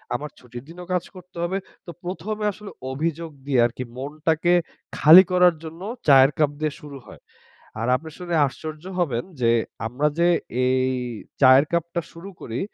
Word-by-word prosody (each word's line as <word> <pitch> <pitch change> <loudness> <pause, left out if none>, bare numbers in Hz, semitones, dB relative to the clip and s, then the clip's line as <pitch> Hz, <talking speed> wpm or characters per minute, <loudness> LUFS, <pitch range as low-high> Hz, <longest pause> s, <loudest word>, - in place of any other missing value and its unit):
আমার 150 +4 -4
ছুটির 120 0 -10
দিনও 175 +2 -10
কাজ 180 - 0
করতে 180 0 -14
হবে। 185 +3 -1 0.3
তো 170 - -7
১ম 180 +4 -4
এ - - +1
আসলে 210 0 -11 0.2
অভিযোগ 165 +4 -3 0.2
দিয়ে 135 -3 +1
আরকি 120 +2 -3
মনটাকে 155 +5 0 0.4
খালি 165 +5 +9
করার 180 -1 +5
জন্য 160 +2 -9 0.3
চায়ের 135 -1 +7
কাপ 150 -2 +3
দিয়ে 155 -1 -1
শুরু 145 -2 -9
হয়। - - -14 0.6
আর 115 - -1
আপনি 160 +4 -10
শুনে 175 -1 -4
আশ্চর্য 155 +3 -8
হবেন, 130 -9 0 0.2
যে 115 -1 +3 0.4
আমরা 125 +6 -1
যে 170 - +4 0.4
এই 130 0 +2 0.5
চায়ের 130 +1 +7
কাপটা 170 0 -1
শুরু 170 +4 -10
করি 115 +1 -5
155 Hz, 165 wpm, -23 LUFS, 135-175 Hz, 0.6 s, খালি